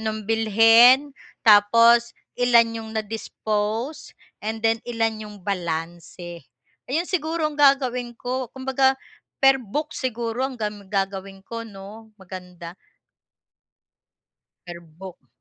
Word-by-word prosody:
nung 220 -1 -4
bilhin 225 +5 +5 0.3
tapos, 230 +3 +5 0.3
ilan 240 -2 +4
yung 220 -1 -7
na-dispose, 220 +4 -3 0.3
and 220 +1 -3
then 225 0 +3
ilan 225 -2 -2
yung 210 - -12
balanse. 170 -2 -5 0.4
Ayun 315 +7 0
siguro 325 -2 -2
ang 300 - -10
gagawin 255 -4 +2
ko 250 0 -4
kumbaga, 265 0 +1 0.5
per 270 0 +6
book 300 +8 -4
siguro 240 0 -3
ang 260 -2 -8
gam 210 -1 -4
gagawin 195 0 -3
ko 230 0 -5
'no, 215 +2 -12
maganda. 180 -2 -10 1.9
Per 175 -1 -8
book. 170 -2 -13
225 Hz, 110 wpm, -23 LUFS, 195-250 Hz, 1.9 s, per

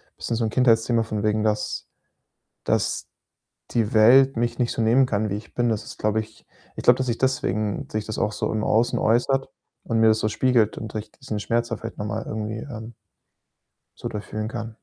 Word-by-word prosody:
bisschen 115 - -3
so 115 - 0
'n - - 0
Kindheitsthema 115 -1 +3
von 110 -2 -3
wegen, 105 0 +1
dass 105 -1 -1 0.8
dass - - 0 0.7
die 115 -2 0
Welt 130 +4 +6
mich 120 0 -1
nicht 120 - +1
so - - -2
nehmen 120 +4 +4
kann, 110 -2 -1
wie 100 - -2
ich 105 +2 -9
bin. 120 -1 +1
Das 110 -2 -1
ist, - - -10
glaube 110 +1 +1
ich 110 0 -15 0.3
ich - - -5
glaube, - - +6
dass 130 - -2
sich 115 -1 0
deswegen 110 -6 -1
sich 110 -1 -2
das 110 - -5
auch 105 - 0
so - - -2
im 110 - -1
Außen 115 +3 +2
äußert 125 +4 +2 0.3
und 115 -1 0
mir 110 - +5
das 110 0 +4
so 110 - 0
spiegelt 115 -2 +2
und 110 0 -7
ich 105 0 -5
diesen 110 -5 -5
Schmerz 120 +2 0
da 115 - -3
vielleicht 115 - -8
noch 105 - -4
mal 110 +2 -3
irgendwie, 110 0 -4
ähm 115 -3 -8 1.0
so - - -5
durch 105 0 -5
fühlen 110 +1 -4
kann. 115 -2 -6
110 Hz, 215 wpm, -24 LUFS, 110-120 Hz, 1.0 s, Welt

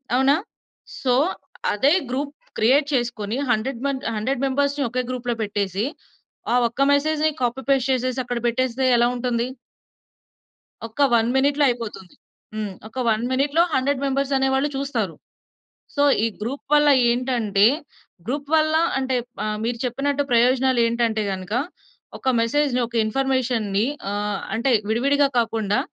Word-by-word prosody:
అవునా? 270 +3 +4 0.7
సో 250 -2 +2 0.6
అదే 270 +8 +3 0.2
group 280 +3 -2 0.3
create 275 +6 +3
చేసుకొని 235 -2 -1
100 245 +2 -1
మంద్ 270 -1 -3
100 250 +5 -1
మెంబర్స్‌ని 280 +1 0
ఒకే 250 +2 -1
గ్రూప్‌లో 245 -2 -2
పెట్టేసి, 205 0 -1 0.7
ఆ - - +4
ఒక్క 235 +4 -5
మెసేజ్‌ని 310 +2 +1
కాపీ 245 +2 -1
పేస్ట్ 270 -1 +2
చేసేసి 255 0 -1
అక్కడ 245 0 -3
పెట్టేస్తే 255 +2 0
ఎలావుంటుంది? 240 0 0 1.4
ఒక 225 +6 -5
1 230 0 +4
మినిట్‌లో 285 +2 +2
అయిపోతుంది. 225 -6 -5 0.4
హ్మ్. 210 -2 -3 0.2
ఒక 220 - -18
1 220 +1 +1
మినిట్‌లో 285 +5 +2
100 270 +1 +1
మెంబర్స్ 275 0 0
అనేవాళ్ళు 265 +2 +1
చూస్తారు. 275 +1 -2 0.8
సో 285 - +1 0.2
ఈ - - +3
గ్రూప్‌ 250 +6 -4
వల్ల 295 0 +5 0.2
ఏంటంటే 235 -5 +2 0.6
గ్రూప్ 280 +3 -3
వల్ల 310 0 +2 0.2
అంటే 260 -1 -1 0.3
ఆహ్, 215 0 -2
మీరు 235 0 -2
చెప్పినట్టు 280 +3 0
ప్రయోజనాలేంటంటే 235 -2 +2
గనుక, 185 +2 -6 0.7
ఒక 260 - 0
మెసేజ్‌ని, 255 +2 +1
ఒక 235 - -20
ఇన్ఫర్మేషన్‌ని 235 -4 0 0.2
ఆహ్, 205 0 -2 0.2
అంటే 250 +3 +1 0.2
విడివిడిగా 280 +5 +2
కాకుండా 220 -3 0
250 Hz, 125 wpm, -22 LUFS, 230-275 Hz, 1.4 s, వల్ల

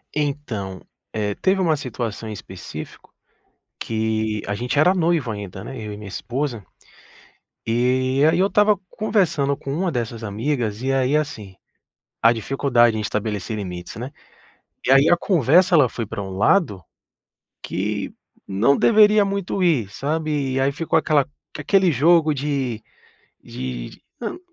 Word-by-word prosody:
Então, 130 -11 -3 0.3
eh, 105 -2 -2
teve 190 0 +1
uma 165 -4 +3
situação 115 -5 -5
em - - -5
específico 105 - -10 0.7
que, 110 -1 -1
a 100 - -2
gente 125 +6 -2
era 180 +5 +5
noivo 165 -7 +1
ainda, 105 -3 -6
né, 135 - -7
eu 105 -1 -6
e - - -7
minha 105 -1 -9
esposa, 120 +1 -4 1.0
e 130 +4 +1
aí 170 - +1
eu 190 - +4
estava 210 0 +3
conversando 185 -10 +1
com 135 - -6
uma 180 +2 -1
dessas 115 -3 -4
amigas, 110 +1 -2
e 135 - 0
aí 135 +2 +2
assim, 110 -11 -4 0.7
a 115 +1 +6
dificuldade 120 -1 +2
em 110 - -2
estabelecer 105 0 -3
limites, 90 -3 -6
né. 125 +5 -6 0.7
E - - +2
aí 135 +3 +6
a 175 - +5
conversa, 175 - +3
ela 140 -7 +5
foi 115 - -4
pra 100 - -5
um 95 - -6
lado 105 - +2 0.8
que 100 +1 -3 0.3
não 110 +9 +2
deveria 210 -2 +5
muito 195 -1 -2
ir, 145 - +2
sabe, 150 -1 -2
e 135 - +1
aí 135 +1 +2
ficou 160 +3 +1
aquela 145 -3 +2 0.3
aquele 185 +4 +3
jogo 155 +2 +4
de 135 -5 -2 0.6
de 65 -2 -6
d - - -17 0.2
não, 235 +9 -5
130 Hz, 150 wpm, -22 LUFS, 110-155 Hz, 1.0 s, a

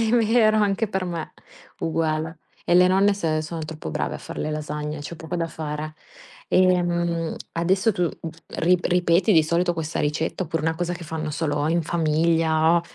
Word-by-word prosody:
Mi 225 -1 +1
mi 230 -2 +3
era 215 -3 +5
anche 205 +2 +1
per 190 -2 -2
me, 170 -3 -5 0.5
uguale, 160 0 -1 0.3
e 175 - +2
le 180 0 +7
nonne 195 +2 +4
se 155 -5 -1
sono 160 +1 -5
troppo 155 - -7
brave - - -2
a - - -5
far - - -8
le 155 - -2
lasagne, 150 0 -4
c'è 160 +3 -7
poco 160 +2 -5
da 165 -1 -1
fare. 155 -1 -5 0.5
Ehm, 175 -2 +2 0.2
adesso 190 +6 +2
tu, 180 - 0 0.2
uhm, 165 - -5 0.3
rip 180 +1 +3
ripeti 180 +3 +3
di 160 -4 +6
solito 170 +2 +1
questa 160 0 -3
ricetta 155 +5 -1
oppure 165 -2 -3
una 160 +1 +1
cosa 175 +1 -2
che 170 0 -9
fanno 160 -1 -4
solo 145 -1 -1
in 170 +1 +1
famiglia, 160 0 +2
165 Hz, 185 wpm, -24 LUFS, 155-180 Hz, 0.5 s, le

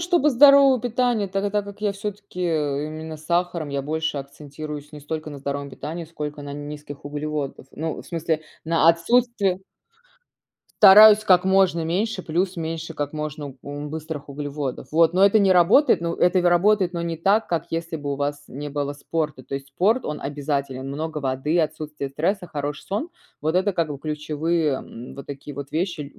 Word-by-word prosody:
чтобы 340 -4 +3
здоровое 275 0 +7
питание. 240 -2 0
Та 195 +1 -2
та 205 - -1
так 205 0 0
как 200 +1 -11
я 210 -1 +1
всё-таки 200 -2 -7
именно 155 0 -2
сахаром. 170 -1 -1
Я 140 -1 -2
больше 160 0 -2
акцентируюсь 145 +1 -8
не 150 - -9
столько 155 +1 -5
на 145 - -8
здоровом 140 +1 -4
питании, 160 +5 -6
сколько 150 -2 -6
на 140 0 -7
низких 145 -1 -8
углеводов. 145 -2 -4
Ну 160 +1 -4
в - - -18
смысле 160 -2 -2 0.2
на 165 0 +3
отсутствие 195 +2 +2 1.2
Стараюсь 210 +1 +9
как 180 -3 +5
можно 190 -3 +3
меньше, 190 +4 -1
плюс 180 +4 -1
меньше 165 0 -4
как 145 -1 -3
можно 150 -2 -5
ум 145 +1 -6
быстрых 155 -2 -6
углеводов, 140 -1 -5
вот. 165 +1 +4
Но 190 +2 +6
это 210 +1 +4
не 195 - +4
работает 185 - +5
ну 170 0 -2
это 180 +1 +3
вь - - -3
работает, 180 +1 +3
но 170 -1 -3
не 165 -1 -3
так, 200 +7 +2
как, 170 -1 -1
если 165 0 -3
бы 145 -1 -4
у - - -3
вас 145 0 -3
не 145 +2 -6
было 145 0 -2
спорта. 150 -2 -3
То 135 - -7
есть 135 0 -9
спорт, 220 +7 +2
он 150 - -4
обязателен. 140 -2 -3
Много 155 +2 -4
воды, 135 +4 -1
отсутствие 150 -3 -2
стресса, 180 +6 -1
хороший 145 -1 -4
сон- 210 - -3 0.3
вот 160 +4 0
это 195 +2 +2
как 165 -3 0
бы 145 -2 -5
ключевые, 155 +1 -1
м, 120 -1 -8
вот 140 - -9
такие 145 +1 -8
вот 140 +1 -8
вещи 160 -4 -2
ль - - -20
160 Hz, 185 wpm, -23 LUFS, 145-185 Hz, 1.2 s, Стараюсь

